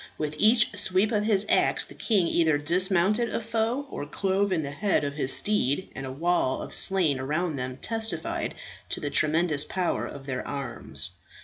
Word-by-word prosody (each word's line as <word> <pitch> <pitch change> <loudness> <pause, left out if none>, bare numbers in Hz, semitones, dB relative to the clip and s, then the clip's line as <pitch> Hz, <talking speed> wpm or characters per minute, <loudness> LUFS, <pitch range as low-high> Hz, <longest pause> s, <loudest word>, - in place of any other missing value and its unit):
With 150 -1 -3
each 220 +1 +4
sweep 190 +4 +2
of 210 -2 0
his 210 -2 +2
axe - - +3
the - - -9
king 200 -7 +1
either 160 -3 +2
dismounted 185 +8 +2
a - - -2
foe 230 +4 -1
or 145 - -6
clove 195 +5 0
in 165 -4 0
the 140 - -5
head 195 +4 0
of 140 -1 -2
his 140 -2 0
steed, 190 -5 +1
and 135 0 -6
a - - -5
wall 160 -2 0
of - - -8
slain 170 -8 +3
around 155 +4 -2
them 130 0 -5
testified 225 +6 -2 0.3
to - - -3
the 145 - -4
tremendous 155 -1 +2
power 180 +2 -2
of 140 -1 -10
their 130 -2 -3
arms. 140 -2 -5
175 Hz, 185 wpm, -26 LUFS, 145-205 Hz, 0.3 s, each